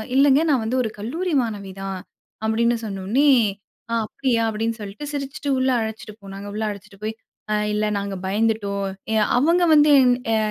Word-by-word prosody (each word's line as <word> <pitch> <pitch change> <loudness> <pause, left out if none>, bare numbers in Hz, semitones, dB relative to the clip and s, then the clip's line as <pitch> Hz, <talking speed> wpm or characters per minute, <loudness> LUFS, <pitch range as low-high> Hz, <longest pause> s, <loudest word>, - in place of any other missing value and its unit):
"இல்லைங்க, 280 +2 +5
நான் 250 -5 +2
வந்து 250 +3 0
ஒரு 220 - -2
கல்லூரி 325 - -3
மாணவி 200 -4 -5
தான்" 195 -1 -4 0.5
அப்படின்னு 235 +2 +2
சொன்னோனனே, 210 +9 +1 0.6
"அ - - -1
அப்டியா?" 235 -1 0
அப்டின்னு 225 +1 -2
சொல்ட்டு 205 +8 -7
சிரிச்சுட்டு 280 0 -4
உள்ள 260 - +2
அழைச்சிட்டு 220 -1 -6
போனாங்க. 195 +1 -8
உள்ள 215 +1 -3
அழைச்சிட்டு 200 -1 -10
போயி, 220 +1 -2 0.4
அ - - +2 0.2
இல்லை 210 0 +1
நாங்க 200 -1 -4
பயந்துட்டோம். 200 -1 0 0.3
எ - - +2 0.2
அவங்க 335 +6 +3
வந்து 295 0 +6 0.4
எ - - +3
220 Hz, 160 wpm, -22 LUFS, 200-265 Hz, 0.6 s, வந்து